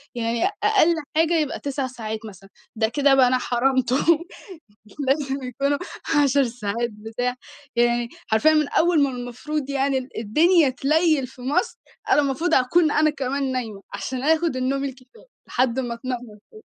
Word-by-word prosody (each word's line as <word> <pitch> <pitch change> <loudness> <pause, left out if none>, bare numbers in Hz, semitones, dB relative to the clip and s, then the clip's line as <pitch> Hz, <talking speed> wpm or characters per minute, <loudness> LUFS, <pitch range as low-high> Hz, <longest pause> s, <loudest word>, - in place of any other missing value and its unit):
يعني 230 0 0 0.2
أقل 395 -6 +4 0.2
حاجة 325 +1 +3
يبقى 300 -2 -2
9 280 -1 -3
ساعات 220 -4 -6
مثلًا، 195 -2 -12 0.3
ده 220 0 +1
كده 280 +3 +3
بقى 260 -2 +5
أنا 255 +1 +2
حرمته 255 0 +1 1.1
لازم 270 -1 0
يكونوا 275 +3 -1 0.5
10 280 0 +3
ساعات 235 -1 -3
بتاع، 225 +4 -4 0.4
يعني 240 0 +2 0.2
حرفيًا 220 +9 +4
من 305 -2 +2
أول 330 -3 +3
ما 280 - +1
المفروض 260 +4 -5
يعني 275 0 +1
ال 260 0 -7
الدنيا 310 - +4
تليّل 295 +1 +1
في 255 0 -15
مصر، 290 - -1 0.3
أنا 295 - +5
المفروض 290 +5 -1
أكون 300 +5 +3
أنا 310 +1 +3
كمان 275 -1 -2
نايمة، 225 -6 -4
عشان 250 +6 -4
آخد 320 0 +2
النوم 265 +2 -1
الكفايه 265 - -9 0.2
لحد 255 0 0
اما 240 -2 -3
تنور 255 +1 -4 0.3
تاني. 435 0 -15
265 Hz, 155 wpm, -23 LUFS, 240-290 Hz, 1.1 s, بقى